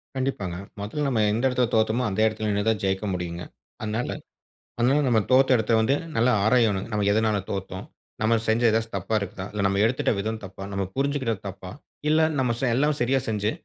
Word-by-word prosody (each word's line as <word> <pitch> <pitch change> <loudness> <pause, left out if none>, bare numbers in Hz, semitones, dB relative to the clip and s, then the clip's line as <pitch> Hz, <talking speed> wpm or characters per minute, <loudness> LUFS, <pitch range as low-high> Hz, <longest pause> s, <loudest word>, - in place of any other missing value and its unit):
கண்டிப்பாங்க. 130 -9 -2 0.3
முதல்ல 145 +9 -3
நம்ம 115 -5 +1
எந்த 115 +4 0
இடத்துல 125 -1 +1
தோத்தோமோ 110 +2 +2
அந்த 95 - -3
இடத்துல 110 0 -1
நின்னு 105 +1 0
தான் 110 -3 0
ஜெயிக்க 95 +2 -1
முடியுங்க. 90 -1 -4 0.4
அதனால 110 +3 -2 0.7
அதனால 130 +5 +3
நம்ம 120 -3 +4
தோத்த 130 +1 +5
இடத்த 110 0 -1
வந்து 110 +5 +2 0.2
நல்லா 120 +2 +3
ஆராயணும். 110 -3 +3
நம்ம 105 -1 0
எதனால 110 -1 +2
தோத்தோம்? 95 -1 -5 0.4
நம்ம 115 +1 +3
செஞ்ச 110 +2 +2
ஏதாச்சு 110 0 0
தப்பா 100 +3 -2
இருக்குதா? 95 -1 -6
இல்ல 105 -1 -1
நம்ம 100 +1 0
எடுத்துட்ட 125 +3 +1
விதம் 110 +2 -3
தப்பா? 95 0 -8
நம்ம 100 0 -1
புரிஞ்சுகிட்டது 135 -6 -1
தப்பா? 95 -1 -9 0.4
இல்ல 155 +1 +4 0.2
நம்ம 125 -3 +1
செ 135 - 0
எல்லாமே 150 +3 +2
சரியா 130 +2 +2
செஞ்சு 105 -1 0
110 Hz, 185 wpm, -25 LUFS, 100-125 Hz, 0.7 s, தோத்த